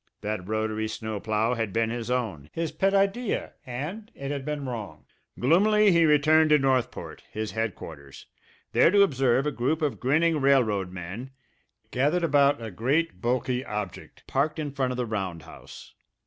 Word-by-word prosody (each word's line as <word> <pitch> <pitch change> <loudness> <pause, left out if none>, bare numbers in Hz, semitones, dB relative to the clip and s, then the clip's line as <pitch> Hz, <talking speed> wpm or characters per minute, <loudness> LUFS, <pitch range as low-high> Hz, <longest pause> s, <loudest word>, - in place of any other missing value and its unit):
That 105 -3 -4
rotary 110 0 -1
snow 110 -1 -5
plough 110 +3 0
had 115 -4 -2
been 115 +2 0
his 120 0 -4
own, 110 - -2
his 165 -1 -2
pet 195 +5 +1
idea 200 +4 0
and 160 - -5
it 140 0 -5
had 140 -2 -3
been 150 -1 -4
wrong! 105 -11 -6 0.3
Gloomily 205 - +4
he 170 -1 +5
returned 155 +1 +4
to 150 - +6
Northport, 130 -3 -1
his 110 0 -4
headquarters, 80 -11 -6 0.5
there - - +5
to 200 +2 +6
observe 135 -5 +2
a 150 - 0
group 145 +5 -1
of 145 - -1
grinning 155 +4 +2
railroad 110 -9 +2
men 95 +8 -7 0.6
gathered 150 +7 +1
about 145 -3 +4
a 110 -2 -6
great, 140 - 0
bulky 125 +1 0
object 105 -6 -6
parked 150 +4 0
in 150 -2 -3
front 135 -2 -1
of 125 - -3
the 125 - -1
roundhouse. 95 -8 -7
130 Hz, 160 wpm, -26 LUFS, 110-150 Hz, 0.6 s, to